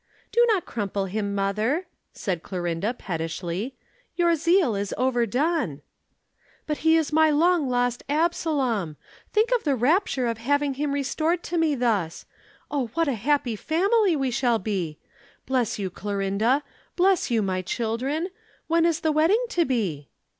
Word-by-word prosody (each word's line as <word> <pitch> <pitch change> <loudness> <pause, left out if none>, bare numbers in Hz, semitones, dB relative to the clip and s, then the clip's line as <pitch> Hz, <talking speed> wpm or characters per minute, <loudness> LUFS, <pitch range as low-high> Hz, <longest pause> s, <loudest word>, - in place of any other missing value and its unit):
"Do 475 - +4
not 410 -5 +2
crumple 200 -3 -2
him, 200 +1 -2
mother," 215 - 0 0.3
said 180 -5 -3
Clorinda 180 +5 -2
pettishly. 175 +6 -4 0.4
"Your 340 -1 +3
zeal 335 - +3
is 200 0 -3
overdone." 250 - 0 0.8
"But 300 -1 -2
he 320 0 +4
is 315 -2 -1
my 315 0 +5
long 315 -1 +3
lost 245 0 0
Absalom! 280 - 0 0.3
Think 440 +3 +2
of 480 - -2
the 285 -3 +2
rapture 265 - +2
of 230 -1 -2
having 285 +3 +1
him 285 +2 -2
restored 310 +5 0
to 345 - -3
me 315 -3 +2
thus. 210 -10 -1 0.5
O 280 -4 0
what 330 -1 +2
a 280 - +1
happy 245 +1 0
family 380 - +2
we 270 -3 0
shall 240 -1 +2
be! 185 -7 -3 0.5
Bless 255 -3 0
you, 195 -3 -3
Clorinda. 205 +8 0 0.3
Bless 370 -3 +3
you, 230 -3 +2
my 185 -1 -1
children. 250 - -2 0.4
When 335 0 +3
is 330 -1 0
the 315 - +2
wedding 340 +11 +3
to 350 -8 +1
be?" 190 - -2
260 Hz, 150 wpm, -25 LUFS, 205-320 Hz, 0.8 s, my